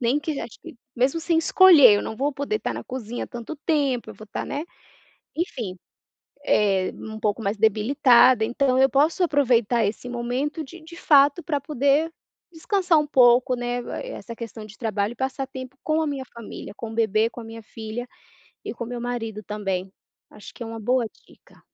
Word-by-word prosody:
nem 250 Hz, +4 st, +2 dB
que 305 Hz, -1 st, -4 dB
acho 230 Hz, -, -8 dB
que -, -, -11 dB, 0.2 s
mesmo 270 Hz, +7 st, +1 dB
sem 330 Hz, 0 st, +1 dB
escolher, 325 Hz, -, +7 dB
eu -, -, -2 dB
não 220 Hz, -, -5 dB
vou 285 Hz, +2 st, 0 dB
poder 285 Hz, +10 st, -2 dB
estar -, -, -3 dB
na -, -, -6 dB
cozinha 240 Hz, -2 st, -5 dB
tanto 240 Hz, +6 st, -7 dB
tempo, 280 Hz, -6 st, 0 dB
eu -, -, -10 dB
vou 215 Hz, -, -12 dB
estar, 205 Hz, -, -5 dB
né, 290 Hz, +2 st, -4 dB, 0.7 s
enfim, 235 Hz, -, -3 dB, 0.7 s
eh, 195 Hz, -7 st, +2 dB
um 220 Hz, 0 st, -8 dB
pouco 215 Hz, +1 st, -1 dB
mais 200 Hz, +1 st, -1 dB
debilitada, 235 Hz, +2 st, +4 dB
então 255 Hz, +3 st, +1 dB
eu 265 Hz, 0 st, +5 dB
posso 305 Hz, +6 st, +2 dB
aproveitar 245 Hz, -7 st, +2 dB
esse 210 Hz, +4 st, -3 dB
momento, 250 Hz, +6 st, -3 dB
de 335 Hz, +5 st, -12 dB
de 335 Hz, +2 st, -12 dB
fato 290 Hz, +1 st, +4 dB
pra 290 Hz, -4 st, -1 dB
poder 285 Hz, +3 st, +1 dB, 0.4 s
descansar 350 Hz, 0 st, +1 dB
um 300 Hz, -, +1 dB
pouco, 250 Hz, -1 st, +4 dB
né, 245 Hz, 0 st, -2 dB
vai -, -, -6 dB
essa 230 Hz, -, -8 dB
questão 230 Hz, -2 st, -8 dB
de 215 Hz, -, -14 dB
trabalho 215 Hz, -1 st, -1 dB
e -, -, -14 dB
passar 265 Hz, +1 st, -3 dB
tempo 260 Hz, 0 st, -9 dB
com 315 Hz, +1 st, +1 dB
a 315 Hz, -, -1 dB
minha 275 Hz, -2 st, -3 dB
família, 230 Hz, -3 st, -9 dB
com 230 Hz, -, -6 dB
o -, -, -8 dB
bebê, 220 Hz, 0 st, +2 dB
com 240 Hz, -, -10 dB
a -, -, -9 dB
minha 225 Hz, 0 st, -9 dB
filha 220 Hz, +3 st, -7 dB, 0.6 s
e -, -, -5 dB
com 235 Hz, -, -5 dB
meu 245 Hz, 0 st, -5 dB
marido 225 Hz, -3 st, -4 dB
também. 195 Hz, -3 st, -3 dB, 0.4 s
Acho 210 Hz, -, -12 dB
que -, -, -9 dB
é -, -, -5 dB
uma 225 Hz, 0 st, -7 dB
boa 245 Hz, +2 st, +1 dB, 0.2 s
dica. -, -, -22 dB
245 Hz, 195 wpm, -24 LUFS, 225-285 Hz, 0.7 s, escolher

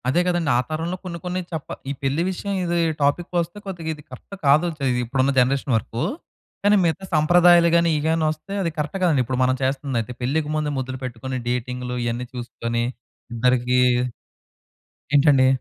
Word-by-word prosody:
అదే 130 Hz, +7 st, +3 dB
గదండీ! 175 Hz, -4 st, +1 dB
ఆ -, -, +3 dB
తరంలో 165 Hz, +3 st, -3 dB
కొన్ని 170 Hz, -2 st, -5 dB
కొన్ని 180 Hz, +1 st, -2 dB
చప్ప 160 Hz, -4 st, -5 dB, 0.2 s
ఈ -, -, 0 dB
పెళ్లి 135 Hz, +4 st, +1 dB
విషయం 200 Hz, +2 st, -3 dB
ఇది 175 Hz, 0 st, 0 dB, 0.2 s
టాపిక్కొస్తే 170 Hz, +5 st, 0 dB
కొద్దిగా 175 Hz, -5 st, -5 dB
ఇది 150 Hz, -1 st, -13 dB
కరెక్ట్ 130 Hz, +10 st, -10 dB
కాదు‌ 150 Hz, +5 st, +5 dB
చే 140 Hz, -, -3 dB, 0.2 s
ఇప్పుడున్న 130 Hz, +3 st, +1 dB
జనరేషన్ 135 Hz, +1 st, +1 dB
వరకు. 115 Hz, +2 st, -4 dB, 0.6 s
కానీ 205 Hz, +1 st, +5 dB
మిగతా 170 Hz, +3 st, 0 dB
సంప్రదాయాలు 175 Hz, +2 st, +6 dB
గాని, 170 Hz, 0 st, +4 dB
ఇవి 145 Hz, -, -3 dB
గాని 160 Hz, 0 st, +1 dB
ఒస్తే 155 Hz, +6 st, -8 dB
అది 170 Hz, -3 st, -1 dB
కరెక్ట్ 150 Hz, +5 st, -2 dB
గాదండి. 155 Hz, -7 st, +3 dB
ఇప్పుడు 130 Hz, +1 st, -2 dB
మనం 130 Hz, 0 st, +2 dB
చేస్తుందయితే 130 Hz, -3 st, -1 dB
పెళ్ళికి 145 Hz, +4 st, 0 dB
ముందే 150 Hz, -1 st, -1 dB
ముద్దలు 130 Hz, 0 st, -4 dB
పెట్టుకొని, 130 Hz, +1 st, -4 dB
డేటింగ్లు 125 Hz, 0 st, -3 dB
ఇయన్నీ 120 Hz, +1 st, -2 dB
చూసుకొని 120 Hz, -1 st, -3 dB, 0.5 s
ఇద్దరికి 125 Hz, +1 st, +2 dB, 1.4 s
ఏంటండి? 140 Hz, -2 st, +5 dB
145 Hz, 160 wpm, -23 LUFS, 125-170 Hz, 1.4 s, సంప్రదాయాలు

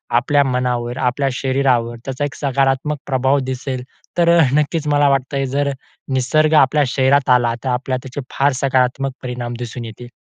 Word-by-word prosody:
आपल्या 140 Hz, +4 st, +3 dB
मनावर 125 Hz, -2 st, -1 dB
आपल्या 130 Hz, +2 st, 0 dB
शरीरावर 130 Hz, -3 st, 0 dB
त्याचा 135 Hz, +2 st, -2 dB
एक 145 Hz, -, -6 dB
सकारात्मक 135 Hz, +1 st, 0 dB
प्रभाव 135 Hz, +1 st, +2 dB
दिसेल. 130 Hz, 0 st, -4 dB, 0.3 s
तर 170 Hz, -1 st, +4 dB, 0.2 s
नक्कीच 150 Hz, +1 st, 0 dB
मला 145 Hz, 0 st, +3 dB
वाटतं 135 Hz, 0 st, 0 dB
जर 140 Hz, 0 st, +1 dB, 0.4 s
निसर्ग 155 Hz, +4 st, +2 dB
आपल्या 150 Hz, -1 st, +3 dB
शरीरात 135 Hz, +2 st, +2 dB
आला 120 Hz, -2 st, +4 dB
तर 130 Hz, -, -2 dB
आपल्याला 125 Hz, +1 st, -1 dB
त्याचे 135 Hz, +2 st, -6 dB, 0.2 s
फार 140 Hz, +1 st, +3 dB
सकारात्मक 135 Hz, 0 st, +1 dB
परिणाम 125 Hz, -1 st, -4 dB
दिसून 120 Hz, 0 st, -6 dB
येतील. 115 Hz, +2 st, -10 dB
130 Hz, 155 wpm, -18 LUFS, 125-140 Hz, 0.4 s, तर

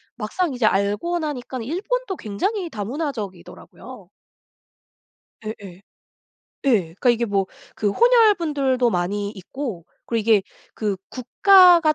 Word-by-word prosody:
막상 270 Hz, +8 st, -2 dB
이제 245 Hz, -3 st, 0 dB
알고 210 Hz, -, +1 dB
나니깐 260 Hz, -5 st, -5 dB
일본도 390 Hz, -, -3 dB
굉장히 355 Hz, -, -3 dB
다문화적이더라고요. 220 Hz, -, -7 dB, 1.4 s
예예. 200 Hz, -4 st, -8 dB, 0.9 s
예. 230 Hz, -7 st, +5 dB
그러니까 245 Hz, +6 st, +2 dB
이게 235 Hz, 0 st, +1 dB
뭐 200 Hz, -3 st, 0 dB, 0.3 s
그 210 Hz, -, 0 dB
혼혈 465 Hz, -, +5 dB
분들도 270 Hz, -7 st, 0 dB
많이 200 Hz, +2 st, -2 dB
있고 210 Hz, -, -7 dB, 0.2 s
그리고 230 Hz, -1 st, 0 dB
이게 215 Hz, -2 st, +3 dB, 0.3 s
그 210 Hz, -3 st, -2 dB
국가가 345 Hz, +5 st, +5 dB
245 Hz, 265 characters per minute, -22 LUFS, 205-335 Hz, 1.4 s, 예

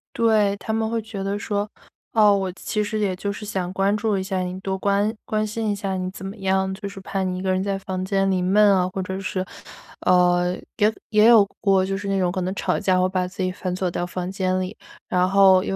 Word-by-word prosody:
对， 215 Hz, -3 st, +3 dB
他 220 Hz, -, -5 dB
们 220 Hz, 0 st, 0 dB
会 230 Hz, 0 st, -1 dB
觉 215 Hz, -2 st, -7 dB
得 200 Hz, +1 st, -2 dB
说， 205 Hz, 0 st, -2 dB, 0.4 s
哦， 210 Hz, -2 st, +6 dB
“我 195 Hz, -2 st, 0 dB
其 210 Hz, +2 st, -3 dB
实 215 Hz, +1 st, -2 dB
也 200 Hz, -3 st, +1 dB
就 200 Hz, +2 st, -3 dB
是 210 Hz, -, -8 dB
想 185 Hz, -3 st, -3 dB
关 195 Hz, +2 st, +2 dB
注 210 Hz, -1 st, 0 dB
一 190 Hz, -, -2 dB
下 190 Hz, 0 st, -2 dB
你， 180 Hz, 0 st, -3 dB
多 190 Hz, 0 st, -2 dB
关 200 Hz, +2 st, +1 dB
关 215 Hz, 0 st, 0 dB
心 220 Hz, +1 st, -2 dB
一 205 Hz, -, 0 dB
下 195 Hz, -1 st, -3 dB
你 185 Hz, 0 st, -2 dB
怎 190 Hz, -, -9 dB
么 195 Hz, -, -5 dB
样， 190 Hz, 0 st, 0 dB
就 200 Hz, +1 st, -6 dB
是 195 Hz, -1 st, -9 dB
怕 195 Hz, 0 st, -3 dB
你 185 Hz, -1 st, -1 dB
一 -, -, -4 dB
个 190 Hz, 0 st, 0 dB
人 185 Hz, 0 st, +1 dB
在 195 Hz, 0 st, -1 dB
房 185 Hz, -1 st, -4 dB
间 195 Hz, 0 st, +1 dB
里 185 Hz, -, +1 dB
闷 200 Hz, +4 st, +4 dB
啊”。 185 Hz, -1 st, +2 dB
或 190 Hz, -, -1 dB
者 190 Hz, +1 st, -4 dB
是 185 Hz, -1 st, -3 dB, 0.6 s
呃， 180 Hz, 0 st, +4 dB, 0.2 s
也 210 Hz, +1 st, +3 dB, 0.2 s
也 215 Hz, +1 st, +5 dB
有 225 Hz, -4 st, +7 dB
过， 195 Hz, -2 st, +3 dB
就 195 Hz, 0 st, -2 dB
是 200 Hz, 0 st, -6 dB
那 195 Hz, 0 st, 0 dB
种 180 Hz, -2 st, +1 dB
可 190 Hz, -, -3 dB
能 185 Hz, +2 st, -2 dB
吵 -, -, 0 dB
架 185 Hz, -2 st, +2 dB
会 185 Hz, 0 st, +2 dB
把 185 Hz, -1 st, -1 dB
自 185 Hz, +1 st, -5 dB
己 185 Hz, -, 0 dB
反 180 Hz, 0 st, -4 dB
锁 185 Hz, -1 st, -1 dB
到 175 Hz, -, -2 dB
房 180 Hz, +1 st, -4 dB
间 185 Hz, -1 st, 0 dB
里。 185 Hz, +3 st, -5 dB, 0.3 s
然 180 Hz, 0 st, +2 dB
后， 190 Hz, -1 st, +6 dB
因 -, -, -2 dB
195 Hz, 275 characters per minute, -23 LUFS, 185-205 Hz, 0.6 s, 有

